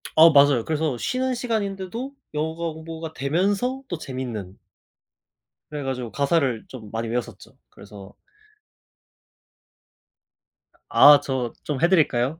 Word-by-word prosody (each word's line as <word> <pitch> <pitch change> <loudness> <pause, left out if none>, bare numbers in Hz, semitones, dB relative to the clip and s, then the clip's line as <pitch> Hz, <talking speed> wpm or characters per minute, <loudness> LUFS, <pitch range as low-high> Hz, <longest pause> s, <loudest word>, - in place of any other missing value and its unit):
어 165 +1 +8
맞아요. 140 -4 +5
그래서 155 -4 -1
쉬는 255 - -1
시간인데도 225 +1 -3 0.2
영어가 160 +2 -3
공부가 160 0 -8
되면서 200 - -1
또 175 - -4
재밌는 120 -10 -6 1.1
그래 150 -1 -5
가지고 125 -3 -4
가사를 140 -5 0
좀 110 -5 -10
많이 115 +1 -3
외웠었죠. 120 +1 -5
그래서 100 -1 -13 2.8
아 145 0 +8
저 130 -4 -3
좀 145 -2 -3
해 170 - +4
드릴까요? 155 -4 +2
150 Hz, 255 characters per minute, -23 LUFS, 125-170 Hz, 2.8 s, 어